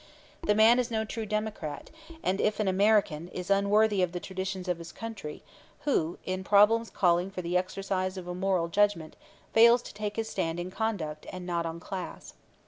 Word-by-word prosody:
The 210 - +2
man 225 +3 +6
is 250 -1 0
no 220 -1 -1
true 220 0 -5
democrat, 215 -8 -4 0.3
and 190 +2 0
if 210 +1 +1
an 210 - +1
American, 190 -4 +2
is 180 +1 -5
unworthy 200 +1 +3
of 180 -1 0
the 175 - -3
traditions 190 0 -5
of 175 -2 -1
his 170 0 -9
country 220 -10 -7 0.4
who, 170 - 0
in 185 0 -3
problems 210 +3 +4
calling 175 0 +2
for 185 -2 -6
the 170 +1 -2
exercise 185 0 -1
of 180 -1 -7
a 180 - -3
moral 180 -2 0
judgment, 200 -4 +1 0.4
fails 235 +2 +6
to - - -10
take 210 0 -4
his 225 -1 -2
stand 170 -5 -2
on 180 +1 -5
conduct 180 -9 -3
and 185 -1 -7
not 170 -1 -1
on 165 +1 -6
class. 185 +2 -7
190 Hz, 190 wpm, -29 LUFS, 175-215 Hz, 0.4 s, man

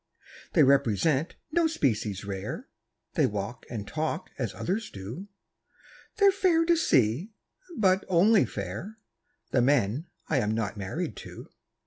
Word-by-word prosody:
They 160 - +6
represent 140 - +2 0.2
no 335 +1 +3
species 110 - -1
rare, 95 -1 -5 0.5
They - - +3
walk 105 +3 -5
and 105 -4 -5
talk 160 +2 -3
as - - -1
others 210 +4 -2
do; 110 - -8 0.9
They're 400 -2 +6
fair 360 -4 +3
to 340 0 +4
see 160 - +2 0.4
but 190 -2 +3
only 190 - +5
fair 105 - -6 0.5
The 125 - +3
men 130 - +2 0.2
I 150 - +2
am 110 -2 0
not 110 -3 -2
married 100 -2 -4
to. - - -10
140 Hz, 130 wpm, -28 LUFS, -, 0.9 s, They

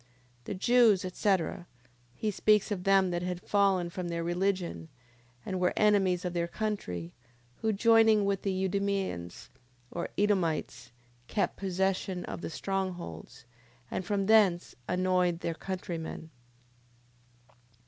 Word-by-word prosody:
The - - -4
Jews, 220 -2 +4
etc... 185 -2 0 0.5
He 215 - -1
speaks 210 +1 +3
of 185 -3 -2
them 195 -2 +4
that 175 0 -1
had 180 0 -3
fallen 195 -3 +1
from 180 0 -4
their 170 -1 -3
religion, 175 -1 -1 0.6
and 185 -2 -3
were 180 0 +2
enemies 195 -4 +3
of 180 - -2
their 170 -1 0
country, 170 - -4 0.4
who 220 - 0
joining 220 0 +5
with 200 -1 0
the 190 -1 -1
Idumeans 190 - -2 0.4
or 170 - -4
Edomites, 165 - 0 0.4
kept 205 - -1
possession 190 -1 -1
of - - -6
the - - -4
strong 190 +3 -2
holds, 130 - -10 0.5
and - - -2
from 195 +1 -1
thence 200 -5 +4
annoyed 180 -1 +1
their 165 - -2
countrymen. 165 -3 -6
185 Hz, 130 wpm, -30 LUFS, 175-200 Hz, 0.6 s, joining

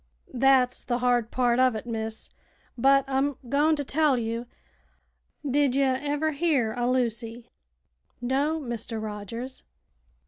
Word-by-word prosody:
"Thet's 255 -1 +3
the 240 - -1
hard 245 -2 +1
part 245 -1 +1
uv 255 -2 +4
it, 220 - -5
miss; 220 -1 -5 0.4
but 275 +2 +4
I'm 270 +1 0
goin' 295 +5 +3
to 290 - -3
tell 290 -1 +2
you. 230 +1 -3 1.0
Did 275 -1 +2
ye 275 - +3
ever 285 +4 0
hear 280 -7 +1
o' 245 0 0
Lucy?" 235 -1 -2 0.7
"No, 275 +6 0
Mr. 235 -4 -4
Rogers." 220 +4 -6
255 Hz, 130 wpm, -26 LUFS, 235-275 Hz, 1.0 s, uv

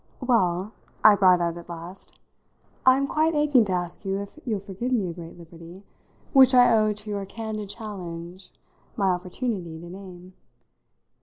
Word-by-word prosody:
"Well," 205 -6 +1 0.3
I 215 - +9
brought 185 -3 +4
out 170 0 -1
at 170 0 -11
last, 170 +2 -10 0.7
"I'm 265 +2 +5
quite 310 +3 +1
aching 290 -6 +4
to 190 - -2
ask 175 +1 -4
you 195 -1 -2
if 200 +9 -8
you'll 215 -4 -1
forgive 200 +6 -5
me 220 -7 +1
a 170 - -5
great 170 0 -10
liberty, 170 +2 -13 0.5
which 260 -2 +7
I 245 -2 +6
owe 215 -1 +3
to 210 +1 -6
your 200 -1 -3
candid 215 -1 -6
challenge 185 -4 -8 0.5
my 195 -2 +2
opportunity 180 -2 -4
to 170 +1 -10
name. 185 -1 -11
195 Hz, 160 wpm, -25 LUFS, 175-225 Hz, 0.7 s, I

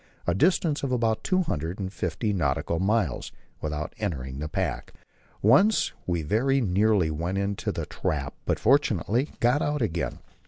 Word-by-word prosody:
a 85 - +2
distance 160 - +2
of 135 - -2
about 115 -3 +1
two 185 0 +2
hundred 85 - -3
and 95 -1 -4
fifty 105 0 -2
nautical 80 -1 0
miles, 100 - 0 0.3
without 75 0 -3
entering 70 -10 -3
the 75 +1 -4
pack. - - -3 0.5
Once 170 - +5 0.2
we 85 -3 0
very 125 - +2
nearly 100 -5 +2
went 85 +5 -2
into 100 0 -1
the - - -4
trap, 70 -3 -3
but - - +2
fortunately 125 +7 +2
got 125 +5 +3
out 150 0 0
again. 85 -6 -2
100 Hz, 155 wpm, -26 LUFS, 80-120 Hz, 0.5 s, Once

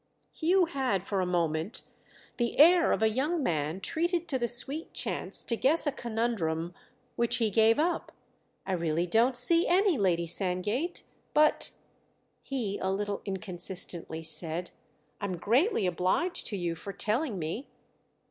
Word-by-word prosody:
Hugh 360 +3 +2
had 260 - -1
for 195 -1 -2
a 180 - -1
moment 170 +1 -1 0.5
the 240 -1 -1
air 340 +3 +6
of - - 0
a - - +5
young 290 +8 -1
man 155 - -1
treated 340 - -1
to 265 -4 0
the 240 - 0
sweet 270 +7 +1
chance - - +3
to 235 - +1
guess 295 +9 +2
a 290 - +1
conundrum—which 230 +1 -3
he 225 -3 0
gave 220 +2 +4
up. 335 +3 -1 0.5
"I - - -4
really 170 -1 0
don't 235 +7 +2
see 335 +8 +3
any, 365 - +3
Lady 175 -3 +1
Sandgate. 200 - -2 0.3
But," 305 0 +3 0.7
he 230 -8 -4
a 190 - -2
little 200 +1 -2
inconsistently 180 -4 -3
said, 165 +2 +2 0.5
"I'm 200 -3 -3
greatly 245 - +1
obliged 185 - -1
to 205 - -3
you 175 -2 -2
for 200 +4 -8
telling 220 - -1
me." 175 - -5
220 Hz, 145 wpm, -29 LUFS, 180-280 Hz, 0.7 s, air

